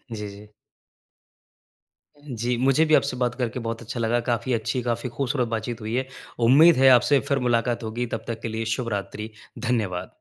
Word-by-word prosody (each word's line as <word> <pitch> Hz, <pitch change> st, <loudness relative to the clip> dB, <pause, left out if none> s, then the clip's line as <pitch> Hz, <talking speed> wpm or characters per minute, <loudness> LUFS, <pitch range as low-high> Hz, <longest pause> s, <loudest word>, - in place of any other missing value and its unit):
जी, 105 Hz, -1 st, -5 dB
जी। 105 Hz, +1 st, -13 dB, 1.8 s
जी, 120 Hz, -1 st, -2 dB
मुझे 135 Hz, +5 st, +3 dB
भी 155 Hz, -, +1 dB
आपसे 140 Hz, -2 st, +1 dB
बात 125 Hz, -1 st, 0 dB
करके 125 Hz, -1 st, -3 dB
बहुत 115 Hz, 0 st, -3 dB
अच्छा 115 Hz, +1 st, -6 dB
लगा। 115 Hz, +1 st, +1 dB
काफ़ी 120 Hz, +2 st, 0 dB
अच्छी, 115 Hz, +3 st, -1 dB
काफ़ी 120 Hz, +1 st, -1 dB
ख़ूबसूरत 130 Hz, -2 st, 0 dB
बातचीत 115 Hz, +1 st, -4 dB
हुई 110 Hz, +2 st, -4 dB
है। 130 Hz, +1 st, -1 dB, 0.4 s
उम्मीद 160 Hz, +5 st, +7 dB
है, 135 Hz, +1 st, +6 dB
आपसे 140 Hz, +3 st, +3 dB
फिर 140 Hz, -, +2 dB
मुलाक़ात 120 Hz, 0 st, 0 dB
होगी। 120 Hz, +3 st, -3 dB
तब -, -, -7 dB
तक 115 Hz, -1 st, -5 dB
के -, -, -3 dB
लिए 115 Hz, 0 st, -2 dB
शुभ 125 Hz, -3 st, -4 dB
रात्रि, 105 Hz, +2 st, -6 dB, 0.4 s
धन्यवाद। 100 Hz, -7 st, -1 dB
120 Hz, 180 wpm, -24 LUFS, 115-125 Hz, 1.8 s, उम्मीद